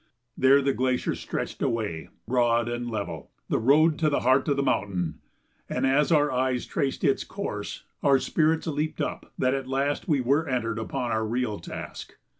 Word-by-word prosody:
There 135 +2 +5
the 135 0 +2
glacier 130 -1 0
stretched - - -5
away, 105 -9 -2 0.2
broad 120 -1 +2
and 120 0 -3
level 100 - -5 0.2
the - - +1
road 150 +6 +4
to 155 - +3
the 145 - 0
heart 130 +2 +3
of 140 -2 +1
the 140 - +1
mountain, 95 -9 -1 0.5
and - - 0
as 140 +4 +3
our 150 -2 +4
eyes 130 -1 0
traced 135 -1 -2
its - - +2
course - - -5 0.2
our 140 -1 +5
spirits 155 +4 +1
leaped 155 0 -2
up - - -4
that 130 0 +2
at 135 -1 -3
last 140 +2 -1
we 150 -5 +2
were 140 +5 +1
entered 115 -3 -1
upon 120 +2 -3
our 110 0 +1
real 110 -1 -1
task. - - -8
130 Hz, 180 wpm, -26 LUFS, 115-140 Hz, 0.5 s, There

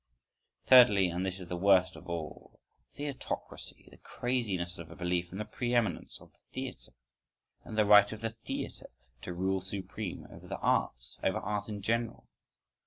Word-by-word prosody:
Thirdly, 105 -8 +8
and 90 +2 -2
this 95 0 -2
is 90 - -7
the 90 - -3
worst 95 0 +4
of 80 - -11
all: 85 -2 -6 0.4
Theatrocracy—, 145 -1 -6
the - - -16
craziness 100 -9 -2
of 85 -1 -8
a 85 - -10
belief 90 0 -1
in 95 - -6
the 105 - -3
pre 120 +3 -2
eminence 110 -8 0
of - - -17
the - - -21
theatre, - - -6 0.7
in 110 - -8
the 110 -1 +4
right 105 0 +7
of 110 0 -7
the 115 0 -1
theatre 115 - -6 0.3
to - - -6
rule 95 +2 0
supreme 95 +1 -5
over - - -12
the - - -4
arts, - - 0
over - - +2
Art 105 0 -3
in 105 -2 -5
general. 115 +2 -1
95 Hz, 175 wpm, -31 LUFS, 90-110 Hz, 0.7 s, Thirdly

